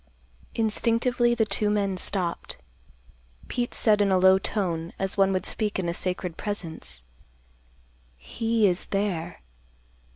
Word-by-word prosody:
Instinctively 235 +2 +2
the 225 -2 +2
two 210 0 0
men 200 -2 0
stopped. 180 -2 0 0.9
Pete 245 -1 -2
said 210 -2 +4
in 200 - +3
a 190 - +4
low 190 +1 +5
tone, 170 -5 -2
as 195 0 0
one 195 -1 +3
would 185 -1 -1
speak 210 -2 -2
in 185 -2 -2
a 170 - -1
sacred 180 -1 -3
presence, 165 - -4 1.1
"He 225 - 0
is 180 -2 +2
there. 180 -4 -3
195 Hz, 130 wpm, -26 LUFS, 180-215 Hz, 1.1 s, low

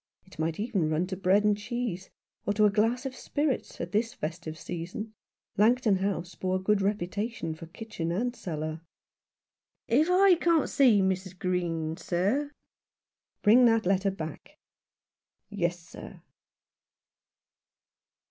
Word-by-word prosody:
It 190 -4 -17
might 160 +2 -1
even 205 -8 0
run 155 +3 +1
to 190 +1 -4
bread 190 +2 +3
and 210 -1 +3
cheese, 210 -3 -4 0.4
or 205 - +2
to 215 +1 +4
a 205 - +4
glass 225 +5 +1
of 260 -1 -4
spirits, 290 -1 -2
at 170 +1 -4
this 225 +3 0
festive 160 0 -5
season. 180 +7 -6 0.4
Langton 220 -1 +4
House 185 -2 -2
bore 185 +2 -2
a - - 0
good 200 +2 +2
reputation 200 -1 -2
for 160 +1 -10
kitchen 175 -2 -5
and 240 +7 -1
cellar. 155 -4 -5 0.6
" - - -66 0.2
If 300 +8 +3
I 365 -1 +5
can't 335 -3 +3
see 240 -8 +5
Mrs. 190 -1 -2
Green, 165 -3 -1
sir? 205 +12 0 0.4
" - - -66
" - - -60
Bring 240 +4 +7
that 225 -2 +3
letter 195 +1 +2
back." 165 -5 -7 0.9
"Yes/ 175 -4 -1
sir." 170 0 -12
195 Hz, 145 wpm, -28 LUFS, 175-225 Hz, 0.9 s, Bring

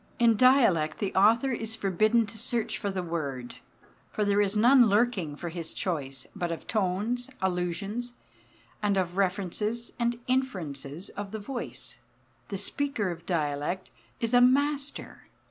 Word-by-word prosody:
In 230 -1 +5
dialect 210 - +4
the 200 - -2
author 230 +7 +4
is 225 -2 -3
forbidden 215 +3 +2
to 215 +2 -10
search 235 -1 -2
for 205 - -2
the 190 -2 -2
word, 140 -8 -4 0.5
for 210 - -1
there 205 0 +3
is 205 +1 +1
none 245 +2 +7
lurking 200 -8 +1
for 170 +3 -5
his 165 -1 -5
choice; 135 -8 -3
but 175 -1 -2
of 165 - -5
tones, 220 +5 -1
allusions, 190 +6 -2 0.7
and 205 -2 +1
of 180 -2 -1
references 200 +4 -1
and 235 0 0
inferences 175 - -2
of 205 -1 -6
the 220 - -5
voice, 210 - -7 0.5
the 200 - -4
speaker 210 -1 -1
of 170 0 -9
dialect 150 0 -1 0.3
is 230 +1 -1
a 245 - +7
master. 280 +3 +1
205 Hz, 145 wpm, -28 LUFS, 175-235 Hz, 0.7 s, none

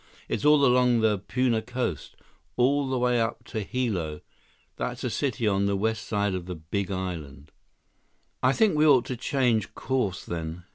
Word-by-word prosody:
It's - - -2
all 150 -1 +6
along 125 -2 +4
the 105 -3 +2
Puna 120 +2 0
coast, 125 - -4 0.4
all 135 +2 +2
the 130 - 0
way 125 -1 +2
up 115 +1 -2
to 110 - -5
Hilo—that's 95 -10 -5
a - - -1
city 120 -5 -1
on 100 -1 +2
the 100 - +1
west 110 +1 -1
side 100 -2 0
of 90 -1 -4
the 90 - -4
Big 85 +5 -3
Island." 80 -7 -5 0.9
"I 130 - +4
think 200 +4 +3
we 155 +1 +4
ought 130 -5 +5
to 130 - -4
change 120 -4 0
course, 125 -9 -2
then. 85 0 -5
110 Hz, 170 wpm, -26 LUFS, 95-125 Hz, 0.9 s, all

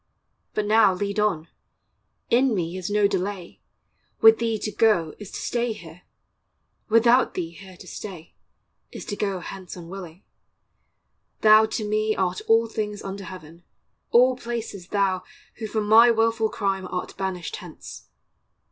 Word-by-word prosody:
But 210 - 0
now 210 -2 +4
lead 200 +2 -2
on; 185 -7 0 0.8
In 250 0 +3
me 170 -1 -2
is 185 0 -4
no 205 0 +3
delay; 190 -2 -4 0.6
with 225 0 +7
thee 230 -1 0
to 215 - -4
go, 205 -10 +2
Is 205 -2 -9
to - - -7
stay 240 -1 -1
here; 170 -3 -13 0.9
without 235 +3 +4
thee 170 -2 -3
here 185 +1 -13
to - - -13
stay, 180 -5 -9 0.6
Is - - -8
to 205 - -4
go 195 -3 -2
hence 185 0 -8
unwilling; 175 0 -9 1.2
thou 215 0 +7
to 215 -1 -3
me 215 0 0
Art 185 -1 -1
all 225 +1 +5
things 210 -2 -4
under 195 0 -6
heaven, 170 -2 -11 0.5
all 250 +2 +5
places 230 -7 -6
thou, 195 -2 0 0.4
Who 220 - -5
for 215 +1 -1
my 220 +3 +7
wilful 225 -1 +2
crime 195 -3 -2
art 180 - -5
banished 185 -4 -4
hence. - - -11
205 Hz, 145 wpm, -24 LUFS, 185-220 Hz, 1.2 s, with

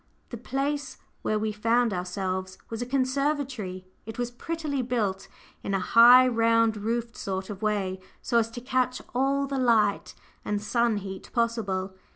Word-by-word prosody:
The 240 - -6
place 275 +4 -3 0.2
where 215 - 0
we 215 0 -1
found 230 +2 +1
ourselves 185 +1 -3
was 225 +1 -4
a 245 - -3
conservatory: 260 -7 -1 0.2
it 225 - -7
was 245 0 -2
prettily 300 +1 -3
built 205 -6 -2 0.3
in 195 - -2
a - - +1
high, 245 +6 +7
round 230 -2 +3
roofed 230 +2 -3
sort 190 +1 -4
of 195 - -8
way, 200 -3 -1 0.2
so 235 - +1
as 225 0 0
to - - -4
catch 255 0 -1
all 275 +2 +1
the 275 -1 -3
light 220 -5 +2 0.3
and 210 0 -1
sun 230 +1 +1
heat 190 -1 -7
possible. 210 -6 -1
230 Hz, 160 wpm, -27 LUFS, 200-255 Hz, 0.3 s, high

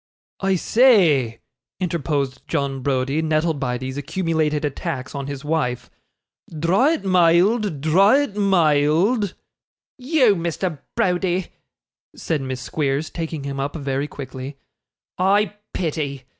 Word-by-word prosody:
'I 195 -1 +1
say,' 170 - +3 0.4
interposed 145 -7 -2
John 140 -4 -2
Browdie, 135 +3 0
nettled 160 -1 0
by 125 -2 -1
these 130 +2 -6
accumulated 155 -1 -1
attacks 140 -2 -4
on 140 -1 -5
his 140 0 -6
wife, 125 -6 -1 0.6
'dra' 180 - +2
it 310 - -4
mild, 185 - +3
dra' 195 - +4
it 250 -8 -6
mild.' 185 - +2 0.6
'You, 255 -5 +3
Mr. 170 -2 -3 0.2
Browdie,' 185 -4 0 0.6
said 155 -4 -2
Miss 130 -1 -4
Squeers, 145 +2 -2
taking 160 -3 -5
him 140 0 -4
up 140 +3 -3
very 140 -1 -2
quickly, 135 0 -8 0.6
'I 200 +3 +2 0.2
pity. 145 -6 -3
160 Hz, 115 wpm, -21 LUFS, 140-185 Hz, 0.6 s, dra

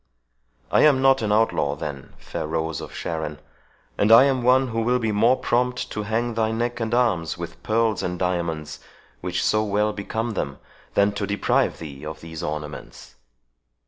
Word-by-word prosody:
I - - +4
am 145 -3 +5
not 135 -1 +4
an 105 -2 0
outlaw, 105 -9 +2
then, 70 -2 -7
fair - - -5
rose 80 -1 -2
of - - -8
Sharon. 80 -2 -4 0.6
And 105 - +3
I 115 +3 +10
am 135 -2 +2
one 130 +1 +4
who 115 0 -1
will 125 +2 +2
be 115 -3 -1
more 115 +5 +4
prompt 125 +1 0
to 105 - -3
hang 115 +3 -1
thy 110 -1 +1
neck 120 +2 -2
and 115 -1 -2
arms 110 -10 +1
with 85 -1 -8
pearls 110 0 +1
and 90 0 -3
diamonds, 85 -4 -2 0.4
which - - -2
so 110 0 +2
well 105 +1 +1
become 110 +3 -3
them, 70 -10 -3 0.4
than 100 0 +4
to 100 0 -3
deprive 100 +1 +1
thee 70 -3 -9
of 80 0 -6
these 80 -1 -8
ornaments." 75 -1 -6
105 Hz, 175 wpm, -23 LUFS, 80-115 Hz, 0.6 s, I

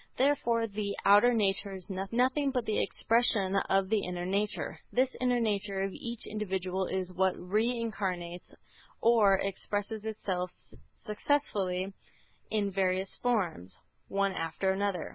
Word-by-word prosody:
Therefore 245 -4 +2
the 205 -1 -3
outer 205 +5 +7
nature 200 -3 +1
is 185 -2 -8
nothing 245 +9 +1
but 250 -3 -1
the 215 - +1
expression 220 -4 +2
of 195 0 +2
the 220 0 +3
inner 180 0 -3
nature. 200 +3 -1
This 255 +1 +1
inner 250 -1 +2
nature 205 -3 -1
of 195 - -2
each 235 -1 -4
individual 190 -3 -2
is 185 -1 -2
what 190 0 +2
re 210 +6 +1
incarnates 185 -6 -4 0.4
or 220 -4 +5
expresses 205 +2 -3
itself 190 -4 -2 0.5
successively 200 -6 -1 0.6
in 205 -2 0
various 190 0 0
forms, 175 - -1 0.3
one 195 0 +1
after 165 +4 -1
another. 195 -1 -1
200 Hz, 130 wpm, -30 LUFS, 190-225 Hz, 0.6 s, outer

